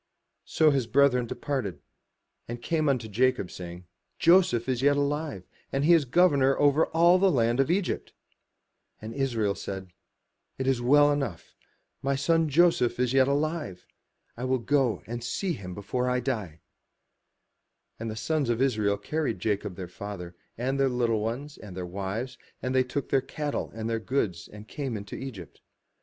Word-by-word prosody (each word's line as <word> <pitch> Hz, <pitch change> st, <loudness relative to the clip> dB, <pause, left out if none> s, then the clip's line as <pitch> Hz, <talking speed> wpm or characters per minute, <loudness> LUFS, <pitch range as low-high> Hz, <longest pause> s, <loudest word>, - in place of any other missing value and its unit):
So 155 Hz, -1 st, +3 dB
his 135 Hz, -5 st, 0 dB
brethren 125 Hz, -1 st, +3 dB
departed: 115 Hz, -, -3 dB, 0.7 s
and 120 Hz, +1 st, -5 dB
came 155 Hz, +3 st, 0 dB
unto 125 Hz, -5 st, 0 dB
Jacob, 125 Hz, -2 st, +1 dB
saying, 90 Hz, 0 st, -8 dB, 0.3 s
''Joseph 170 Hz, -9 st, +4 dB
is 130 Hz, -2 st, 0 dB
yet 145 Hz, +1 st, +4 dB
alive, 145 Hz, -, -2 dB, 0.2 s
and 135 Hz, +1 st, 0 dB
he 170 Hz, -, +6 dB
is 160 Hz, -4 st, +4 dB
governor 135 Hz, -2 st, +3 dB
over 145 Hz, +2 st, +4 dB
all 170 Hz, +3 st, +4 dB
the 195 Hz, +1 st, +4 dB
land 120 Hz, -5 st, +2 dB
of 135 Hz, -, +3 dB
Egypt. 185 Hz, +1 st, -1 dB, 0.9 s
And 110 Hz, +1 st, -7 dB
Israel 115 Hz, -7 st, 0 dB
said, 95 Hz, -2 st, -7 dB, 0.6 s
"It 130 Hz, -, -2 dB
is 135 Hz, -2 st, +2 dB
enough: 140 Hz, -, +2 dB
Joseph -, -, -47 dB, 0.5 s
my 140 Hz, +1 st, 0 dB
son 165 Hz, +3 st, +2 dB
is 130 Hz, -6 st, +3 dB
yet 135 Hz, -1 st, +5 dB
alive: 145 Hz, -, -2 dB, 0.5 s
I 120 Hz, -, -7 dB
will 130 Hz, 0 st, +1 dB
go 130 Hz, -1 st, +1 dB
and 120 Hz, +1 st, -5 dB
see 185 Hz, +8 st, -2 dB
him 90 Hz, -, -7 dB
before 125 Hz, +5 st, -2 dB
I 125 Hz, 0 st, +1 dB
die. 105 Hz, -, -3 dB, 1.4 s
And 115 Hz, 0 st, -4 dB
the 110 Hz, -, -5 dB
sons 145 Hz, +3 st, -1 dB
of 120 Hz, -1 st, +1 dB
Israel 110 Hz, -6 st, +1 dB
carried 145 Hz, +2 st, -2 dB
Jacob 100 Hz, -1 st, -2 dB
their 90 Hz, 0 st, -6 dB
father, 90 Hz, -1 st, -8 dB, 0.2 s
and 130 Hz, +4 st, -1 dB
their 135 Hz, -1 st, +3 dB
little 120 Hz, -3 st, +1 dB
ones, 125 Hz, +7 st, -4 dB
and 95 Hz, -4 st, -10 dB
their 90 Hz, -, -3 dB
wives, 100 Hz, +7 st, -4 dB, 0.2 s
and 130 Hz, 0 st, -3 dB
they 130 Hz, 0 st, +4 dB
took 130 Hz, +2 st, -4 dB
their 135 Hz, -, +3 dB
cattle 145 Hz, +2 st, -4 dB
and 110 Hz, 0 st, -4 dB
their 115 Hz, 0 st, -1 dB
goods, 110 Hz, -8 st, -2 dB
and 105 Hz, +1 st, -12 dB
came 135 Hz, -4 st, -4 dB
into 100 Hz, 0 st, -8 dB
Egypt. 115 Hz, -11 st, -8 dB
125 Hz, 165 wpm, -27 LUFS, 110-145 Hz, 1.4 s, he